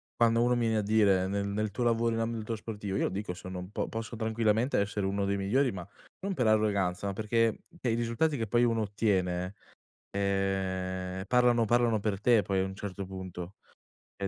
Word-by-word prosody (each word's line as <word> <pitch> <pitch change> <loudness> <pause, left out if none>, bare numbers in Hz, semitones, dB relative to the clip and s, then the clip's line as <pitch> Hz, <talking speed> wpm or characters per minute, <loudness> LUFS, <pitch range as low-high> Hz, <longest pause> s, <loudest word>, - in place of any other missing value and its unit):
quando 115 0 +3
uno 125 0 +3
mi 120 - 0
viene 110 -1 +2
a - - +2
dire, 100 -3 +3
nel 100 +1 -1
nel 105 +1 -1
tuo 115 +5 -2
lavoro 115 -1 +2
in - - -1
ambito 115 0 -2
sportivo, 105 -3 -4
io - - +1
lo - - +1
dico, 95 -1 -4
sono 90 0 -7
un 90 +2 -8
po' - - -2
posso 115 +1 -5
tranquillamente 110 +2 +1
essere 100 0 -1
uno 100 +1 0
dei 100 0 0
migliori, 125 +7 +2
ma 90 -1 -7 0.3
non 195 +1 -2
per 125 -10 +1
arroganza, 100 -4 +2
ma 100 - -2
perché 110 +2 +1 0.2
e 125 - 0
i - - +1
risultati 120 +6 0
che 115 -3 -2
poi 120 +3 +3
uno 115 -2 +2
ottiene, 95 -3 0 0.6
ehm, 95 -1 -1
parlano 120 0 +4
parlano 120 -1 +3
per 100 -2 -1
te, 115 +1 +4
poi, 95 0 -1
a 95 - +1
un 95 0 -6
certo 100 -1 -5
punto, 95 0 -7 0.6
e 100 - -2
105 Hz, 205 wpm, -30 LUFS, 95-115 Hz, 0.6 s, parlano